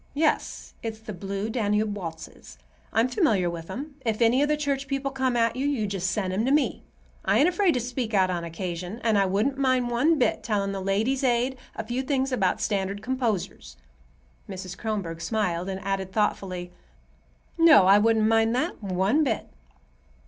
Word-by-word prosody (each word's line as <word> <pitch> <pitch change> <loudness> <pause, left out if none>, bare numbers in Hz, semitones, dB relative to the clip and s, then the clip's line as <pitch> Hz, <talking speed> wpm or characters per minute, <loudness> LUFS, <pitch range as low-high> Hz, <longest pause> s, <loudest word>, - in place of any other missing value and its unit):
"Yes; 310 +1 -1
it's 225 -1 -4
the 220 -1 -8
Blue 195 +3 -4
Danube 210 -2 0
waltzes. 165 -5 -8 0.3
I'm 225 +3 +3
familiar 220 - +1
with 165 -1 -8
'em. 285 +2 -7
If 220 -2 -1
any 240 +3 +4
of 290 - +3
the 300 - +2
church 280 -2 -2
people 275 0 -2
come 260 -2 0
at 230 0 +2
you, 270 +3 -1
you 265 -7 0
just 195 -2 -2
send 185 -2 -1
'em 205 +4 0
to 265 - +1
me. 295 0 +1 0.4
I - - +2
ain't 300 - +5
afraid 360 -3 +2
to - - +1
speak 245 -1 -3
out 185 -1 +3
on 175 -1 -2
occasion, 175 +4 -5
and 225 -2 +2
I 195 -1 +3
wouldn't 220 +9 0
mind 255 -2 +2
one 300 +7 +3
bit 255 - +1
telling 200 -3 -1
the 195 -1 -4
Ladies' 220 +8 0
Aid 250 +1 +1 0.2
a 225 - -4
few 240 +3 -2
things 270 0 -1
about 255 - +1
standard 200 -1 -2
composers." 245 -7 -3 0.7
Mrs. 185 -2 -6
Kronborg 190 -7 -4
smiled, 180 -2 -1
and 190 0 -4
added 195 -1 -2
thoughtfully, 185 -4 -1 0.9
"No, 315 - +7
I 195 +2 +7
wouldn't 220 0 +3
mind 225 +1 +3
that 310 +4 -2
one 195 - +1
bit." 275 - -2
220 Hz, 185 wpm, -26 LUFS, 195-260 Hz, 0.9 s, No